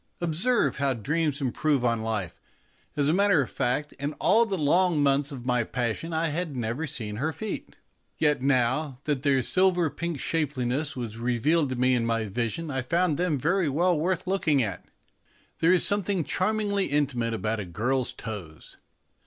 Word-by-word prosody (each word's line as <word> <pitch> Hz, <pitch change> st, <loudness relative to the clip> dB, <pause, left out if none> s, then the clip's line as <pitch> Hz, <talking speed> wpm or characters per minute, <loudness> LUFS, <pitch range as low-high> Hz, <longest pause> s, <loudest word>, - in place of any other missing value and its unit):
Observe 175 Hz, +9 st, +2 dB
how 140 Hz, -2 st, +1 dB
dreams 150 Hz, +5 st, -1 dB
improve 135 Hz, +1 st, 0 dB
on 115 Hz, -2 st, +1 dB
life! 110 Hz, -5 st, -3 dB, 0.6 s
As 145 Hz, -1 st, +2 dB
a 155 Hz, -, +3 dB
matter 200 Hz, -2 st, +4 dB
of -, -, -9 dB
fact, 150 Hz, +4 st, -1 dB
in 145 Hz, +2 st, -3 dB
all 220 Hz, +9 st, +3 dB
the 195 Hz, -3 st, -2 dB
long 170 Hz, +2 st, +3 dB
months 140 Hz, +1 st, +2 dB
of 125 Hz, -3 st, -8 dB
my 125 Hz, -2 st, +2 dB
passion 120 Hz, +8 st, -3 dB
I 160 Hz, 0 st, 0 dB
had 160 Hz, -1 st, -3 dB
never 120 Hz, +6 st, -2 dB
seen 105 Hz, -5 st, -4 dB
her 155 Hz, +7 st, -1 dB
feet, 215 Hz, +7 st, -6 dB, 0.4 s
yet 150 Hz, -4 st, +2 dB
now 130 Hz, +1 st, +1 dB
that 145 Hz, -4 st, -1 dB
their 135 Hz, -2 st, +2 dB
silver 180 Hz, 0 st, +2 dB
pink 170 Hz, -4 st, -4 dB
shapeliness 145 Hz, -1 st, -1 dB
was 115 Hz, -3 st, -6 dB
revealed 130 Hz, +6 st, +1 dB
to 130 Hz, -, -2 dB
me 125 Hz, +1 st, +2 dB
in 120 Hz, -2 st, +1 dB
my 115 Hz, -1 st, 0 dB
vision 120 Hz, +9 st, -3 dB
I 130 Hz, -1 st, -1 dB
found 165 Hz, +3 st, +1 dB
them 175 Hz, -4 st, 0 dB
very 170 Hz, +4 st, +1 dB
well 175 Hz, +6 st, +2 dB
worth 180 Hz, +3 st, -1 dB
looking 165 Hz, -8 st, +2 dB
at. 95 Hz, -4 st, -4 dB, 0.8 s
There 165 Hz, -, +4 dB
is 180 Hz, -2 st, +4 dB
some 205 Hz, +1 st, +2 dB
thing 190 Hz, -2 st, -1 dB
charmingly 200 Hz, +2 st, 0 dB
intimate 130 Hz, -5 st, 0 dB
about 110 Hz, +1 st, -2 dB
a 100 Hz, -, -4 dB
girl's 120 Hz, +9 st, -1 dB
toes. 95 Hz, -9 st, -9 dB
145 Hz, 180 wpm, -26 LUFS, 120-170 Hz, 0.8 s, matter